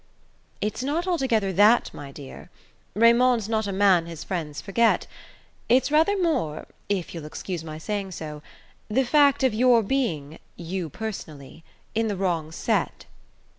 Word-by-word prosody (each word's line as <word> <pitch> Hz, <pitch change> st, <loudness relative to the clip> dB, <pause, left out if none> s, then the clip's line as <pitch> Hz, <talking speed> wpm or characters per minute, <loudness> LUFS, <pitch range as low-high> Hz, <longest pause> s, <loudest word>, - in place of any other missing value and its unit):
"It's 210 Hz, +4 st, -2 dB
not 300 Hz, +6 st, -1 dB
altogether 255 Hz, -, 0 dB
that, 210 Hz, +6 st, +4 dB
my 140 Hz, -1 st, -9 dB
dear; 140 Hz, -1 st, -11 dB, 0.5 s
Raymond's 235 Hz, 0 st, +4 dB
not 220 Hz, -2 st, -1 dB
a -, -, -2 dB
man 190 Hz, -4 st, +3 dB
his 165 Hz, -2 st, -7 dB
friends 160 Hz, -6 st, -4 dB
forget. 230 Hz, +3 st, +2 dB, 0.6 s
It's 255 Hz, +4 st, +3 dB
rather 325 Hz, +7 st, +3 dB
more, 265 Hz, -, -1 dB, 0.2 s
if 195 Hz, -4 st, -2 dB
you'll 165 Hz, -3 st, -7 dB
excuse 170 Hz, +2 st, -5 dB
my 155 Hz, -1 st, -7 dB
saying 195 Hz, +3 st, -4 dB
so, 150 Hz, -2 st, -7 dB, 0.5 s
the 260 Hz, +5 st, +1 dB
fact 285 Hz, 0 st, +4 dB
of 260 Hz, -4 st, +3 dB
your 240 Hz, 0 st, +4 dB
being 170 Hz, -, -2 dB, 0.2 s
you 175 Hz, 0 st, -4 dB
personally 160 Hz, -7 st, -8 dB, 0.3 s
in 225 Hz, +1 st, 0 dB
the 205 Hz, -3 st, -2 dB
wrong 170 Hz, -5 st, -1 dB
set." -, -, -1 dB
205 Hz, 145 wpm, -25 LUFS, 165-245 Hz, 0.6 s, that